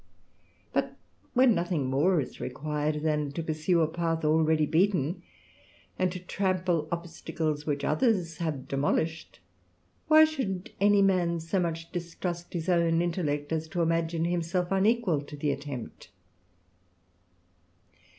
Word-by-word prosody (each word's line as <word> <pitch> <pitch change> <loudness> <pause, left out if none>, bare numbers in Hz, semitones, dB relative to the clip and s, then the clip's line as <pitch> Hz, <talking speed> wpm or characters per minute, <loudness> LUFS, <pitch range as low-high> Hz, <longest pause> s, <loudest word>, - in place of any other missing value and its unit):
*^^t - - 0 0.4
when 255 -1 +6
nothing 170 -7 -1
more 150 +7 +2
is 130 - -5
required, 150 +3 -2
than 150 -2 0
to 165 +3 -4
pursue 160 +2 +1
a 160 - +3
path 165 0 -1
^^^eady 155 0 +3
beaten, 175 -1 +1 0.8
and 185 -1 +2
to 180 - -5
trample 180 -3 -1
obstacles 160 -3 -3
which 145 -1 -1
others 170 - +1
have 160 -3 -1
^^molished, 155 +4 -1 0.7
why 310 0 +8
should 230 - -3
any 205 0 +5
man 175 -3 +2
so 165 +4 -1
much 165 -1 -3
distrust 175 0 -5
his 170 -1 -3
own 170 -2 +3
^tellect 145 -4 -2
as 160 0 -1
to 170 +2 -1
imagine 165 0 0
himself 175 +1 -1
unequal 195 -5 +2
to 145 0 -10
the 145 0 0
attempt 140 -4 -7
165 Hz, 130 wpm, -28 LUFS, 155-180 Hz, 0.8 s, why